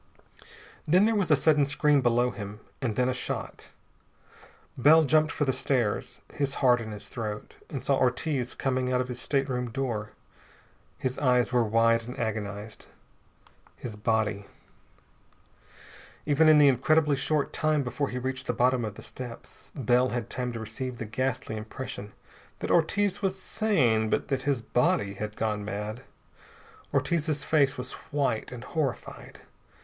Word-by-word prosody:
Then 180 +6 +5
there 225 - +3
was 200 -6 +1
a 150 - +7
sudden 150 0 +3
scream 150 0 +3
below 120 0 +2
him, 105 -1 -7 0.2
and 115 -6 -1
then 125 0 +2
a 130 - +1
shot. 125 - -5 1.1
Bell 155 +5 +6
jumped 155 +2 +3
for 145 - -1
the 130 - +1
stairs, 125 -5 -1
his 140 -1 -1
heart 125 -3 +4
in 110 - -6
his 105 -1 -7
throat, 105 -3 -5 0.2
and 140 - -5
saw 140 - +3
Ortiz 130 0 0
coming 130 -1 -1
out 125 - +2
of 125 0 -2
his 125 0 -4
stateroom 130 -3 -1
door. 115 -4 -3 0.8
His 130 0 -3
eyes 125 -3 +2
were 120 -1 +4
wide 115 +1 +2
and 125 - -7
agonized. 110 -2 -4 0.9
His 115 -4 -7
body.... 105 -1 0 1.8
Even 155 +2 +4
in 155 - +7
the 145 -1 +7
incredibly 145 +3 +3
short 140 +2 0
time 155 -2 +1
before 130 +3 -2
he 125 - -4
reached 130 +1 -4
the - - +1
bottom 125 +1 +2
of 105 -2 -4
the - - -10
steps, 125 -2 -9
Bell 125 -1 +2
had 120 -2 -4
time 125 -1 -2
to 115 - -5
receive 125 +3 -5
the 115 - -5
ghastly 120 0 -2
impression 110 -1 -6 0.5
that - - -3
Ortiz 200 +5 +2
was 195 -1 0
sane, 130 - +1
but - - -1
that 135 +1 -1
his 130 -5 0
body 105 -4 +1
had 105 +1 -6
gone 105 -2 -1
mad. 105 +4 -5 0.9
Ortiz's 155 -4 0
face 145 -3 +2
was 125 0 -6 0.2
white 135 -7 -1
and 125 -1 -8
horrified. 145 -6 -4
125 Hz, 155 wpm, -28 LUFS, 115-145 Hz, 1.8 s, a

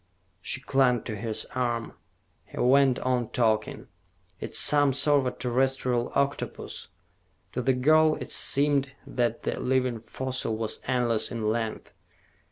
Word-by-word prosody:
She 130 - -1
clung 130 -4 +2
to 110 - -5
his 110 +1 -3
arm. 120 -2 -2 0.5
He - - -14
went 135 0 +4
on 125 -3 0
talking. 110 -3 0 0.5
"It - - -6
is - - +4
some 145 -2 +3
sort 140 -1 +2
of 125 - -4
terrestrial 125 -1 0
octopus...." 140 +1 -2 0.7
To - - -2
the 130 +2 +2
girl, 155 +4 +4
it - - -7
seemed 140 -1 +2
that 120 -2 -1
the - - -2
living 125 -2 0
fossil 130 -1 -3
was 110 -1 -3
endless 120 -3 +1
in 115 -3 -3
length. 110 0 -2
125 Hz, 140 wpm, -27 LUFS, 115-135 Hz, 0.7 s, went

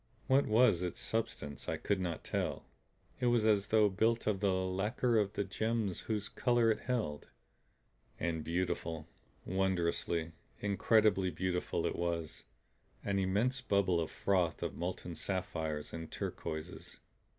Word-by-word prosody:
What 135 +2 +4
was 110 -5 +5
its 90 -1 -3
substance 75 -10 -3
I - - -1
could 100 -2 0
not 85 -3 -3
tell. - - -2 0.5
It 125 - +1
was 120 -2 +3
as 105 -2 +3
though 110 -1 +5
built 110 +4 +1
of 105 -3 +1
the 100 -1 +2
lacquer 100 +6 +1
of 105 -1 0
the - - 0
gems 110 0 -1
whose 105 -2 -2
colors 120 -1 +3
it - - -15
held. 110 - -2 0.9
And 80 -1 -1
beautiful, 85 -2 -2 0.4
wondrously, 85 -3 0 0.3
incredibly 100 -1 +3
beautiful 90 0 -1
it - - 0
was 85 -2 -3 0.6
an 100 -1 0
immense 105 +8 +1
bubble 100 -6 +2
of 80 - -2
froth 90 -5 0
of - - -2
molten 90 0 -4
sapphires 80 -4 -3
and 80 -1 -6
turquoises. 80 -1 -5
95 Hz, 140 wpm, -34 LUFS, 85-110 Hz, 0.9 s, was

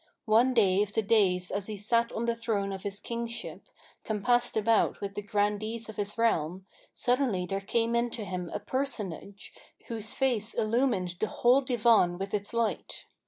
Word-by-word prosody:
One 235 +4 +4
day 195 -4 +4
of 205 -1 -2
the 220 - +1
days 195 -4 +2
as 200 0 -3
he 215 -1 -5
sat 230 +3 +1
on 230 - -2
the 235 - +1
throne 210 -4 -1
of 190 - -6
his 200 0 -4
Kingship, 235 +1 -5 0.4
compassed 240 +3 +1
about 220 +1 +2
with 200 -1 -5
the 205 - -4
Grandees 210 +2 -1
of 220 - -9
his 205 +1 -3
realm, 190 -5 0 0.3
suddenly 245 -8 0
there 195 +1 -3
came 230 +3 0
in 235 +1 +1
to 225 -2 -4
him 180 -2 -4
a 210 - -3
Personage, 205 - -4 0.4
whose 220 -2 -5
face 235 -5 0
illumined 215 -6 0
the 215 - +1
whole 250 +5 +3
Divan 230 -8 +3
with 195 +1 -5
its 205 -1 -2
light. 230 -2 -2
215 Hz, 175 wpm, -29 LUFS, 200-235 Hz, 0.4 s, One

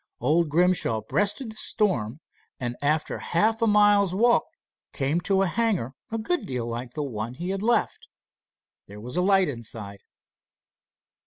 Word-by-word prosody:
Old 155 +6 +2
Grimshaw 170 -8 +2
breasted 205 - -1
the - - -13
storm, 160 - -1 0.4
and 120 -2 -3
after 150 +2 0
half 220 +6 +1
a 230 - +3
mile's 205 -3 +4
walk 235 +4 +3 0.5
came 145 +5 0
to 195 +1 +2
a - - +2
hangar 190 - 0 0.2
a 225 - -3
good 345 +11 -2
deal 125 -3 -3
like 120 +1 -5
the 150 - -3
one 115 -2 -5
he 175 +6 -4
had 195 0 -3
left. 235 +3 0 0.8
There 100 +1 -11
was 125 +6 -6
a 180 - +2
light 190 0 +4
inside. 110 -6 -6
170 Hz, 155 wpm, -25 LUFS, 125-205 Hz, 0.8 s, mile's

